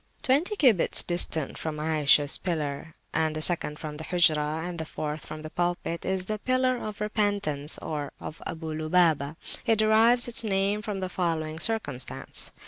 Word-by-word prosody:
Twenty 305 Hz, +9 st, +2 dB
cubits 245 Hz, -, +5 dB
distant 165 Hz, -4 st, +1 dB
from 155 Hz, -1 st, -4 dB
Ayishah's 150 Hz, -2 st, +3 dB
Pillar, 155 Hz, -3 st, -3 dB, 0.2 s
and 155 Hz, -1 st, +1 dB
the -, -, -2 dB
[p.336] -, -, 0 dB
second 160 Hz, -4 st, -1 dB
from 150 Hz, -1 st, -7 dB
the 155 Hz, -, -6 dB
Hujrah, 155 Hz, -3 st, +2 dB
and 175 Hz, -1 st, -5 dB
the 160 Hz, -, -3 dB
fourth 150 Hz, 0 st, -5 dB
from 155 Hz, -, -8 dB
the 155 Hz, -, -8 dB
Pulpit, 175 Hz, -1 st, -2 dB
is 190 Hz, -1 st, -1 dB
the 215 Hz, +2 st, -3 dB
Pillar 255 Hz, +1 st, +1 dB
of 215 Hz, -3 st, -7 dB
Repentance, 205 Hz, -9 st, 0 dB
or 145 Hz, -3 st, -5 dB
of 160 Hz, -, -8 dB
Abu 160 Hz, -1 st, -5 dB
Lubabah. 155 Hz, -2 st, +2 dB, 0.3 s
It 225 Hz, -1 st, +4 dB
derives 225 Hz, +3 st, +4 dB
its 235 Hz, -1 st, -1 dB
name 200 Hz, 0 st, 0 dB
from 205 Hz, -2 st, -4 dB
the 185 Hz, -, -2 dB
following 160 Hz, -3 st, -2 dB
circumstance. 155 Hz, -, -2 dB
170 Hz, 170 wpm, -27 LUFS, 155-210 Hz, 0.3 s, cubits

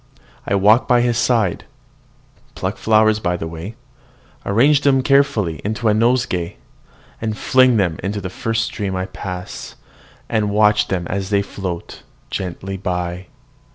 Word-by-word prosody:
I 100 Hz, -, +1 dB
walk 105 Hz, +5 st, +4 dB
by 120 Hz, -1 st, +4 dB
his 120 Hz, -1 st, +1 dB
side, 110 Hz, -7 st, +1 dB, 0.9 s
pluck -, -, -3 dB
flowers 110 Hz, 0 st, +3 dB
by 90 Hz, -4 st, -1 dB
the 80 Hz, -, -5 dB
way, 85 Hz, +7 st, -7 dB, 0.7 s
arrange 135 Hz, +8 st, +4 dB
them 135 Hz, -2 st, +3 dB
carefully 130 Hz, -, +2 dB
into 110 Hz, +2 st, -1 dB
a -, -, +4 dB
nosegay, 110 Hz, -6 st, +1 dB, 0.6 s
then 110 Hz, -1 st, -2 dB
fling 130 Hz, +2 st, +4 dB
them 90 Hz, -6 st, 0 dB
into 100 Hz, +1 st, -3 dB
the 95 Hz, -2 st, -6 dB
first 110 Hz, +3 st, -1 dB
stream 100 Hz, -3 st, -4 dB
I 95 Hz, 0 st, -2 dB
pass, 95 Hz, 0 st, -7 dB, 0.5 s
and 110 Hz, -2 st, 0 dB
watch 105 Hz, 0 st, +3 dB
them 90 Hz, -2 st, -2 dB
as 95 Hz, 0 st, -3 dB
they 100 Hz, -1 st, +2 dB
float 95 Hz, -4 st, -6 dB, 0.3 s
gently 95 Hz, +1 st, -5 dB
away. 90 Hz, 0 st, -3 dB
105 Hz, 145 wpm, -19 LUFS, 95-115 Hz, 0.9 s, walk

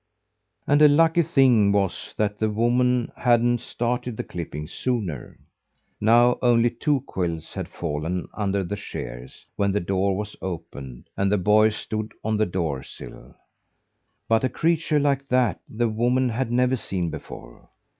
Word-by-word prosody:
And 145 Hz, +1 st, +3 dB
a 150 Hz, -, +9 dB
lucky 165 Hz, +3 st, +4 dB
thing 135 Hz, -9 st, +4 dB
it -, -, +2 dB
was 100 Hz, -2 st, -1 dB
that 105 Hz, -1 st, -1 dB
the 110 Hz, -, +1 dB
woman 120 Hz, +3 st, +1 dB
hadn't 120 Hz, -1 st, +2 dB
started 120 Hz, -1 st, -3 dB
the -, -, -3 dB
clipping 75 Hz, -3 st, -6 dB
sooner. 110 Hz, -, -3 dB, 0.6 s
Now 120 Hz, +3 st, +4 dB
only 120 Hz, -1 st, +4 dB
two 145 Hz, -3 st, 0 dB
quills 85 Hz, -6 st, -4 dB
had -, -, -4 dB
fallen 85 Hz, +2 st, -3 dB
under 100 Hz, -2 st, -1 dB
the 100 Hz, +3 st, -4 dB
shears' 60 Hz, -10 st, -8 dB
when 100 Hz, -1 st, +1 dB
the 105 Hz, -, +1 dB
door 95 Hz, +1 st, 0 dB
was 105 Hz, 0 st, -5 dB
opened 70 Hz, -8 st, -7 dB
and 100 Hz, 0 st, 0 dB
the 105 Hz, -, +3 dB
boy 105 Hz, +3 st, +4 dB
stood 110 Hz, 0 st, -5 dB
on 110 Hz, 0 st, 0 dB
the 110 Hz, -, +2 dB
door 80 Hz, -7 st, -2 dB
sill. -, -, -12 dB, 0.9 s
But 115 Hz, +1 st, +2 dB
a 130 Hz, -, +2 dB
creature 160 Hz, 0 st, +1 dB
like 140 Hz, -1 st, 0 dB
that 125 Hz, -3 st, +1 dB
the 120 Hz, +2 st, 0 dB
woman 120 Hz, +3 st, +1 dB
had 120 Hz, +1 st, -2 dB
never 125 Hz, +1 st, +2 dB
seen 90 Hz, -6 st, -2 dB
before. -, -, -10 dB
110 Hz, 155 wpm, -24 LUFS, 95-125 Hz, 0.9 s, a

